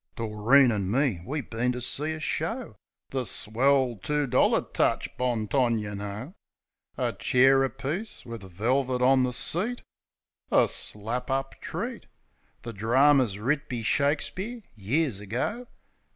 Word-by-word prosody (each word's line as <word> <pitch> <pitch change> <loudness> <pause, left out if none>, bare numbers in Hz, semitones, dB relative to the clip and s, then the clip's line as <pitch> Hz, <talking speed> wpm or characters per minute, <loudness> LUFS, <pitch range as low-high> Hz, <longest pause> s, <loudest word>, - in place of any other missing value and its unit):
Doreen 115 +4 +4
an' 100 -4 -1
me, 120 - +1
we 150 +3 -2
bin 120 +1 -2
to 125 - -4
see 150 +5 -2
a 155 - -6
show 150 - -3 0.2
— - - -65
The 130 -1 -1
swell 125 +2 +1
two 150 -1 0
dollar 130 -1 +3
touch. - - -1
Bong 120 -4 -1
tong, 120 -2 +2
yeh 105 -1 -4
know. 105 - -6 0.6
A - - 0
chair 135 +1 +4
apiece 140 +11 -4
wiv 115 -1 -7
velvit 125 +7 -1
on 130 +1 +5
the 125 0 +1
seat; 200 - 0 0.7
A - - +5
slap 115 +6 -3
up 135 0 -1
treat. - - -5 0.6
The 115 - -6
drarmer's 125 +1 +3
writ 140 +8 -1
be 120 -2 -3
Shakespeare, 160 - -1
years 115 +3 0
ago. 125 - -3
125 Hz, 140 wpm, -27 LUFS, 110-140 Hz, 0.7 s, on